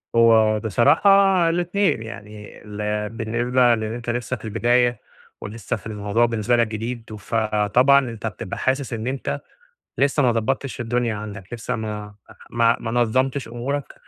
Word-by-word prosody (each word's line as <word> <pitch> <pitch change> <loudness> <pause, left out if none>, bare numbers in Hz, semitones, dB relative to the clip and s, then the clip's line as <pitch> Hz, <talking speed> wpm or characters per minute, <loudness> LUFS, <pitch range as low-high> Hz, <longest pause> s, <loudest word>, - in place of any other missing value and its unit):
هو 110 -2 +5
بصراحة 115 - +3 0.4
الاتنين، 175 - 0
يعني 105 -2 -10
ال 105 0 -3
بالنسبة 120 +2 +1
لإن 110 0 -4
أنت 120 0 -6
لسّه 120 +1 -2
في 110 - -12
البداية، 120 +2 +2 0.4
ولسّه 110 -1 -4
في - - -9
الموضوع 105 +2 0
بالنسبة 115 +1 0
لك 115 -1 +2
جديد، 110 0 -5
فطبعًا 110 +6 +3
أنت 115 -1 -5
بتبقى 95 -3 -6
حاسس 130 -1 -1
إن 115 +1 -4
أنت 135 0 -3 0.6
لسّه 140 +1 +2
ما 120 - +4
ضبطّتش 130 +3 -2
الدنيا 120 -1 -1
عندك، 105 -1 -8
لسّه 120 +1 -3
ما 105 -2 -6 0.3
ما 115 0 +2
ما 115 - -4
نظمتش 130 +3 0
أمورك، 130 +5 -4
115 Hz, 145 wpm, -22 LUFS, 110-125 Hz, 0.6 s, هو